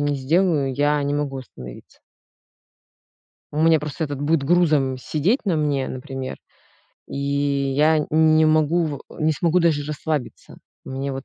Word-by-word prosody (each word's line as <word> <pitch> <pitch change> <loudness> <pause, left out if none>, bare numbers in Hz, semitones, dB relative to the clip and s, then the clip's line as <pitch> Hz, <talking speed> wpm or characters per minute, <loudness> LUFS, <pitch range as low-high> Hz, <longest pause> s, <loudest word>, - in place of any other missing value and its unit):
не 145 0 0
сделаю, 150 0 +1
я 145 +1 +1
не 145 +1 -1
могу 145 -2 -2
остановиться. 65 - -12 1.5
У 150 - -2
меня 165 -1 +5
просто 150 +2 -4
этот 145 -2 -5
будет 150 0 +1
грузом 150 -5 +2
сидеть 165 - 0
на 185 -6 +1
мне, 145 -3 0
например, 130 0 -6 0.7
и - - -7
я 140 +2 +1
н 150 - -2 0.3
не 160 - +5
могу 155 +2 +2
в 145 -3 -4 0.2
не 155 +1 +2
смогу 170 +3 +1
даже 155 -4 +1
расслабиться. 150 -2 -5 0.3
Мне 135 +1 -4
вот 135 0 -6
145 Hz, 150 wpm, -22 LUFS, 140-160 Hz, 1.5 s, меня